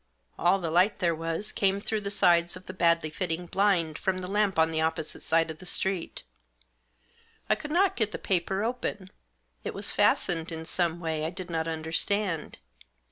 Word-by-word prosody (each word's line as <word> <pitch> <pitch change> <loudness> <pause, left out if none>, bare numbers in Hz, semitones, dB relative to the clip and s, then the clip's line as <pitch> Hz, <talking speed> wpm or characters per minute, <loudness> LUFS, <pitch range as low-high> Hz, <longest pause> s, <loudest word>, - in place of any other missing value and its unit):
All 175 +3 +4
the 170 -4 -3
light 180 +5 +3
there 175 -3 +1
was 165 +5 -3
came 195 0 +1
through 215 +1 -1
the 200 - -3
sides 175 -3 +3
of 185 - -15
the 185 - -7
badly 170 -3 +2
fitting 175 +1 -2
blind 175 -4 +1
from 190 -1 0
the 185 -1 -5
lamp 205 -1 +1
on 160 0 +4
the 160 0 0
opposite 160 -1 -2
side 165 0 +2
of 155 - -10
the - - -11
street 190 -1 -1 1.2
I - - +4
could 300 - -5
not 365 +5 +3
get 220 -3 +1
the - - -4
paper 190 +2 0
open. 220 -5 -3 0.5
It - - -4
was - - -1
fastened 165 0 +2
in 160 0 -5
some 170 0 -1
way 160 -2 -2
I 160 - 0
did 180 0 -8
not 160 0 -1
under 160 0 -4
stand. 190 -2 0
175 Hz, 190 wpm, -28 LUFS, 165-195 Hz, 1.2 s, All